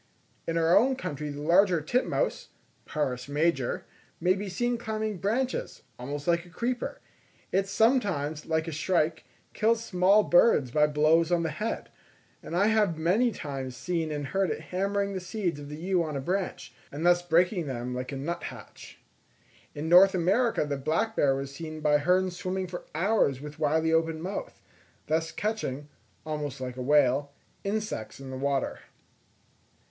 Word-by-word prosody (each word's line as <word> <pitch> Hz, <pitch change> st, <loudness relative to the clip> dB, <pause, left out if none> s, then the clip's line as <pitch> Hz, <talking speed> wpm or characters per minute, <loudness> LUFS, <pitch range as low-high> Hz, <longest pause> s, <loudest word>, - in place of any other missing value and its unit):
In 165 Hz, -, 0 dB
our 165 Hz, +1 st, +4 dB
own 260 Hz, +5 st, +4 dB
country 150 Hz, -, -5 dB
the 145 Hz, 0 st, -6 dB
larger 175 Hz, +2 st, +4 dB
titmouse 250 Hz, -, -1 dB, 0.4 s
(Parus 125 Hz, -4 st, -2 dB
major) 145 Hz, -3 st, 0 dB, 0.3 s
may 180 Hz, +2 st, +3 dB
be 200 Hz, +1 st, -4 dB
seen 240 Hz, +5 st, -1 dB
climbing 215 Hz, -3 st, -3 dB
branches, 245 Hz, +7 st, -2 dB, 0.2 s
almost 145 Hz, +4 st, -5 dB
like 170 Hz, 0 st, +2 dB
a 175 Hz, -, -16 dB
creeper; 240 Hz, +8 st, -3 dB, 0.5 s
it 195 Hz, +1 st, +1 dB
sometimes, 195 Hz, -, +1 dB
like 160 Hz, 0 st, 0 dB
a -, -, -3 dB
shrike, 160 Hz, 0 st, 0 dB, 0.3 s
kills 225 Hz, +1 st, +2 dB
small 195 Hz, +3 st, +4 dB
birds 175 Hz, -, +4 dB
by 150 Hz, +2 st, +4 dB
blows 155 Hz, +3 st, +3 dB
on 170 Hz, -1 st, +2 dB
the 160 Hz, -, -1 dB
head; 215 Hz, +7 st, -4 dB, 0.5 s
and 170 Hz, -, -6 dB
I 200 Hz, -, +4 dB
have 210 Hz, -7 st, +2 dB
many 195 Hz, +10 st, +2 dB
times 135 Hz, -, -6 dB
seen 165 Hz, +2 st, -2 dB
and 145 Hz, -1 st, -3 dB
heard 190 Hz, +7 st, 0 dB
it -, -, -3 dB
hammering 200 Hz, +2 st, 0 dB
the 190 Hz, -, -2 dB
seeds 180 Hz, -4 st, -3 dB
of 145 Hz, 0 st, -9 dB
the 150 Hz, -, -6 dB
yew 180 Hz, +2 st, +1 dB
on 155 Hz, -3 st, -3 dB
a -, -, -1 dB
branch, 175 Hz, -6 st, -3 dB, 0.2 s
and 150 Hz, +4 st, -4 dB
thus 175 Hz, 0 st, +5 dB
breaking 175 Hz, 0 st, +2 dB
them 125 Hz, -1 st, -4 dB
like 125 Hz, +1 st, -4 dB
a -, -, -4 dB
nuthatch. 165 Hz, +6 st, -7 dB, 0.8 s
In 150 Hz, +2 st, -4 dB
North 185 Hz, +3 st, +7 dB
America 195 Hz, +3 st, +2 dB
the 145 Hz, -1 st, -2 dB
black 165 Hz, +11 st, -1 dB
bear 135 Hz, -2 st, +3 dB
was 135 Hz, 0 st, -5 dB
seen 155 Hz, +1 st, -7 dB
by 150 Hz, -1 st, +3 dB
Hearne 185 Hz, +4 st, +2 dB
swimming 185 Hz, +1 st, -3 dB
for 175 Hz, -1 st, -7 dB
hours 180 Hz, -, +2 dB
with 150 Hz, +2 st, -9 dB
widely 160 Hz, +1 st, +2 dB
open 165 Hz, -1 st, +1 dB
mouth, 195 Hz, -, -6 dB, 0.4 s
thus 160 Hz, +1 st, 0 dB
catching, 150 Hz, -10 st, -3 dB, 0.4 s
almost 150 Hz, -3 st, -4 dB
like 125 Hz, -1 st, -5 dB
a 130 Hz, -, -6 dB
whale, 140 Hz, 0 st, +3 dB, 0.3 s
insects 200 Hz, -, -3 dB
in 135 Hz, -1 st, -8 dB
the -, -, -5 dB
water. 140 Hz, 0 st, -1 dB
165 Hz, 165 wpm, -28 LUFS, 145-195 Hz, 0.8 s, North